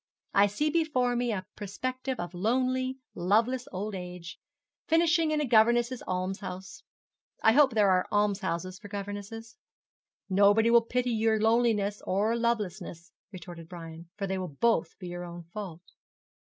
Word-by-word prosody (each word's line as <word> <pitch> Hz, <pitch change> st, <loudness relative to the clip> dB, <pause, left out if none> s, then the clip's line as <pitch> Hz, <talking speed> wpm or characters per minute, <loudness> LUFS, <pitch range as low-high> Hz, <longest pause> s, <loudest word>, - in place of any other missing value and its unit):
I 200 Hz, +1 st, +5 dB
see 295 Hz, +10 st, -1 dB
before 290 Hz, -7 st, +1 dB
me 240 Hz, 0 st, 0 dB
a 190 Hz, -3 st, -3 dB
perspective 255 Hz, +5 st, -4 dB
of 175 Hz, +1 st, -5 dB
lonely, 255 Hz, +6 st, 0 dB, 0.2 s
loveless 230 Hz, +8 st, +1 dB
old 205 Hz, +3 st, -4 dB
age 180 Hz, -2 st, -7 dB, 0.5 s
finishing 330 Hz, 0 st, +3 dB
in 305 Hz, 0 st, +1 dB
a 300 Hz, -, +1 dB
governess' 240 Hz, +1 st, +3 dB
almshouse. 185 Hz, 0 st, -4 dB, 0.6 s
I 220 Hz, -, +7 dB
hope 265 Hz, -1 st, +4 dB
there 205 Hz, -3 st, +4 dB
are 185 Hz, 0 st, +2 dB
almshouses 190 Hz, -3 st, -1 dB
for 210 Hz, -, -10 dB
governesses. 205 Hz, +3 st, -7 dB, 0.7 s
'Nobody 205 Hz, +4 st, +4 dB
will 235 Hz, 0 st, +7 dB
pity 250 Hz, +2 st, -1 dB
your 220 Hz, -1 st, +2 dB
loneliness 220 Hz, -2 st, +2 dB
or 210 Hz, +5 st, +1 dB
lovelessness,' 205 Hz, -7 st, -2 dB, 0.2 s
retorted 175 Hz, -3 st, -10 dB
Brian, 165 Hz, -1 st, -9 dB
'for 200 Hz, -, -2 dB
they 190 Hz, 0 st, -2 dB
will 185 Hz, -, -3 dB
both 225 Hz, -9 st, +1 dB
be 180 Hz, -, -8 dB
your 175 Hz, 0 st, -5 dB
own 175 Hz, 0 st, -8 dB
fault.' 185 Hz, -5 st, -7 dB
210 Hz, 145 wpm, -29 LUFS, 185-240 Hz, 0.7 s, I